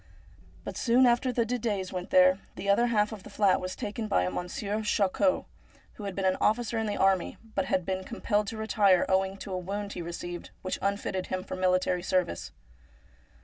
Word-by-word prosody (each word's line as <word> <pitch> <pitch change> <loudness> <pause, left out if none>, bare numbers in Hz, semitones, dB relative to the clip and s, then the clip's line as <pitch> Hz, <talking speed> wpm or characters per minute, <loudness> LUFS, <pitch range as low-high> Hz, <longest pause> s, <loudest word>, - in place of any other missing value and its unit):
But - - -6
soon 250 +2 +4
after 245 +1 +3
the 235 -1 +1
Didets 215 -6 -2
went 180 -1 -4
there, 185 +1 +5 0.2
the 200 - -6
other 220 +5 +4
half 210 -2 +2
of 215 -3 -7
the - - -12
flat 195 -3 +2
was 185 0 -4
taken 215 +1 -4
by 90 - +2
a 90 - -1
Monsieur 200 - -3
Charcot, 210 +7 +1 0.5
who 210 - -10
had 195 -2 -4
been 195 - -1
an 185 0 +2
officer 230 +1 +1
in 220 - -1
the 205 - -2
army, 190 -2 +2 0.2
but 195 - 0
had 185 -2 0
been 190 -1 -2
compelled 210 -1 -1
to 220 - -5
retire, 205 -4 +3
owing 190 0 +1
to 195 -1 -7
a - - -1
wound 200 +3 -4
he - - -5
received, 175 +1 -6
which 185 - -3
unfitted 195 -1 -1
him 185 0 -3
for - - -6
military 185 -1 +1
service. 180 -1 -1
195 Hz, 200 wpm, -29 LUFS, 185-215 Hz, 0.5 s, there